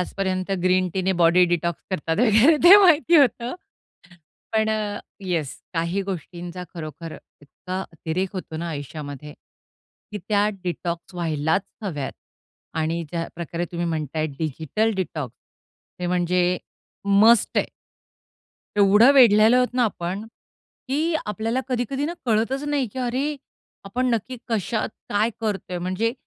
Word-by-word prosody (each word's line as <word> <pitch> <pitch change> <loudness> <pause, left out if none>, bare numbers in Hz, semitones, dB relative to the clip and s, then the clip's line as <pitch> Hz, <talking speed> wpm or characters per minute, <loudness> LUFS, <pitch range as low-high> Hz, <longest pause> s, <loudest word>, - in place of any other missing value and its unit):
आजपर्यंत 185 0 -2
ग्रीन 185 0 +3
टीने 190 0 +1
body 175 +2 +6
detox 170 -1 -1
करतात 165 -2 -1
वगैरे 240 +7 +5
ते 375 +3 +11
माहिती 345 -4 +5
होतं. 250 -3 +3 1.0
पण 220 0 +2
अ, 210 -1 -2 0.3
येस 165 -7 -2 0.2
काही 170 +4 0
गोष्टींचा 180 -1 -6
खरोखर 165 0 -7 0.3
इतका 185 +6 -6
अतिरेक 165 +4 -3
होतो 180 -4 -6
ना, 170 +2 -4
आयुष्यामध्ये 145 -1 -7 0.8
की 210 - -3
त्या 205 -1 +3 0.2
डिटॉक्स 175 0 -4
व्हायलाच 160 +1 0 0.2
हव्यात 150 -9 -3 0.7
आणि 165 +2 -1
ज्या 165 -1 -2
प्रकारे 170 0 -4
तुम्ही 170 0 -2
म्हणताय 155 -1 -2
डिजिटल 160 +8 -1
डिटॉक्स 155 - -4 0.6
ते 180 - -1
म्हणजे 180 0 +1 0.6
मस्ट 230 +1 +5
आहे. - - -1 1.1
एवढं 205 +5 +7
वेढलेलो 230 -3 +6
आहोत 250 0 +3
ना, 250 -1 +3
आपण 190 -1 -3 0.7
की 315 +5 0
आपल्याला 225 +4 -1
कधी-कधी 255 +2 -1
ना, 335 - -3
कळतच 230 +5 +1
नाही 285 -3 +1
की - - -7
अरे! 260 +4 -1 0.5
आपण 250 +6 -1
नक्की 230 +3 -4
कशात 220 0 -1 0.2
काय 210 +3 +1
करतोय? 200 -5 -3
म्हणजे 185 +6 -1
185 Hz, 130 wpm, -23 LUFS, 170-225 Hz, 1.1 s, ते